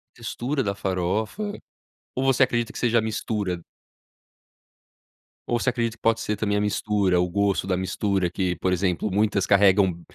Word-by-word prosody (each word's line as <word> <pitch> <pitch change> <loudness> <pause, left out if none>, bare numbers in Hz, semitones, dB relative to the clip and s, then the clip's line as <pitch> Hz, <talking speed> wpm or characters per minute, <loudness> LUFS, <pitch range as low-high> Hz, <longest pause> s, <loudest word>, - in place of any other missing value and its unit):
Textura 125 +4 -3
da 100 -2 -2
farofa. 100 - -2 0.6
Ou 130 - -1
você 135 -1 +4
acredita 120 -2 0
que - - -6
seja 120 -1 +2
a - - 0
mistura? 105 -4 -2 1.9
Ou 120 -1 +1
você 125 - +1
acredita 115 -2 -2
que - - -62
pode 115 0 +2
ser 105 - -1
também 105 0 0
a - - +1
mistura, 105 -3 +1
o 90 - +2
gosto 100 +1 +1
da 95 - +1
mistura 95 0 0
que, 90 0 -1
por 95 - 0
exemplo, 90 +2 0
muitas 100 -1 +1
carregam, 95 -3 +4
105 Hz, 165 wpm, -24 LUFS, 95-115 Hz, 1.9 s, você